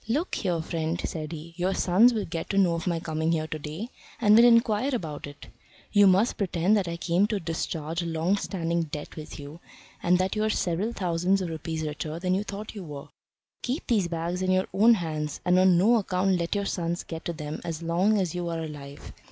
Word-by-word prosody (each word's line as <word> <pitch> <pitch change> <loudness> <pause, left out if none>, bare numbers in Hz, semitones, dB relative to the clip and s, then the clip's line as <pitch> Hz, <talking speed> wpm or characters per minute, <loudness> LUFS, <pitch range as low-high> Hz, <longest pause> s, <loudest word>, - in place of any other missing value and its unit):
"Look 295 +11 -1
here, 175 -5 -1
friend," 165 0 -2
said 155 -1 -5
he. 165 +1 -8
"Your 185 +2 0
sons 205 +7 +5
will 220 -4 -2
get 165 0 -5
to 195 - -1
know 185 -4 +4
of 165 +2 -3
my 170 -2 0
coming 160 0 -1
here 155 -1 0
to 155 0 -5
day, 155 +10 -6 0.3
and 210 -2 +5
will 230 - +8
inquire 230 +2 +4
about 155 -9 -5
it. 145 0 -11 0.5
You 205 -1 +6
must 190 +5 +3
pretend 185 0 +2
that 200 -4 +1
I 170 0 -3
came 175 +4 +2
to 210 -2 -1
discharge 165 -1 -3
a 170 - -4
long 165 +4 +1
standing 170 -4 -1
debt 150 -1 -7
with 155 -1 -8
you, 145 +3 -9 0.4
and 180 +1 +3
that 185 +2 0
you 215 - 0
are 215 - +1
several 195 +2 0
thousands 180 -2 +1
of 185 -3 -3
rupees 160 0 -4
richer 155 +1 -4
than 180 +1 0
you 195 +2 +1
thought 210 +1 -7
you 205 -3 -7
were. 145 -4 -8 0.5
Keep 260 +5 -3
these 210 -7 +2
bags 170 +2 -3
in 185 - 0
your 185 +1 +3
own 225 +4 +6
hands, 155 -5 -3
and 180 0 +4
on 185 -1 +5
no 220 +7 +5
account 190 -2 +1
let 170 +4 -1
your 200 0 -1
sons 175 -2 -2
get 165 -1 -7
to 170 - -2
them 150 -1 -6
as 165 -1 -5
long 180 +6 +2
as 180 -4 -1
you 175 -1 -3
are 165 -1 -3
alive. 145 -2 -9
175 Hz, 225 wpm, -27 LUFS, 160-200 Hz, 0.5 s, will